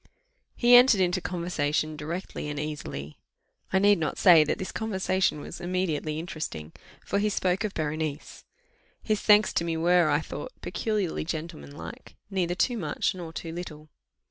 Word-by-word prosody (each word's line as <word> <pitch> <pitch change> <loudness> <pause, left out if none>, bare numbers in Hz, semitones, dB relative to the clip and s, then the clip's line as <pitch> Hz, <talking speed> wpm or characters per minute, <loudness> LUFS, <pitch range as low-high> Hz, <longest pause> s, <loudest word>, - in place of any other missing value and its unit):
He 240 0 +4
entered 245 -4 +7
into 180 0 +1
conversation 155 -4 -1
directly 160 0 -5
and 145 0 -4
easily. 145 - -6 0.5
I 190 - +3
need 205 -1 +5
not 155 - -2
say 175 -6 +7
that 150 - -1
this 185 - -5
conversation 190 -6 0
was 170 - -8
immediately 175 -4 -1
interesting, 155 - -5 0.3
for 200 - 0
he 210 +1 +1
spoke 190 -1 0
of 210 -2 -3
Berenice. 155 -1 -4 0.6
His 215 -2 0
thanks 210 0 +5
to - - +1
me 165 -1 -2
were, 175 0 +4
I 145 0 +3
thought, - - -7
peculiarly 210 -6 -2
gentlemanlike, 160 - -7 0.2
neither 180 -2 0
too 240 +5 +1
much 155 -6 -1
nor 175 -3 -7
too 165 +1 -6
little. 155 -3 -8
170 Hz, 155 wpm, -27 LUFS, 155-190 Hz, 0.6 s, entered